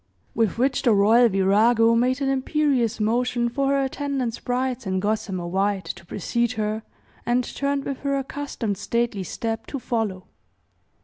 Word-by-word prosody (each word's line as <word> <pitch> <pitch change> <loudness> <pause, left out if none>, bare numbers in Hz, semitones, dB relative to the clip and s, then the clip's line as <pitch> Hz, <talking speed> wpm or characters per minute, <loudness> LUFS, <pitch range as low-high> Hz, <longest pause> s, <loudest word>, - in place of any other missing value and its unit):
With 225 -3 +1
which 265 +2 +1
the 245 -5 +4
royal 225 +4 +5
virago 220 +4 +4
made 250 +4 +2
an 270 - +1
imperious 265 -4 +1
motion 240 +2 +1
for 275 +3 -1
her 275 0 +2
attendant 270 -3 -2
sprites 250 -1 -2
in 190 0 0
gossamer 195 -3 -2
white 195 +2 0
to - - -7
precede 235 +6 -1
her, 215 -1 -2 0.4
and 245 +1 +1
turned 280 +2 -2
with 275 - -4
her 275 -1 -1
accustomed 265 -7 -4
stately 235 -1 -1
step 225 +5 -4
to 280 - -4
follow. 220 -7 -2
235 Hz, 150 wpm, -24 LUFS, 210-265 Hz, 0.4 s, royal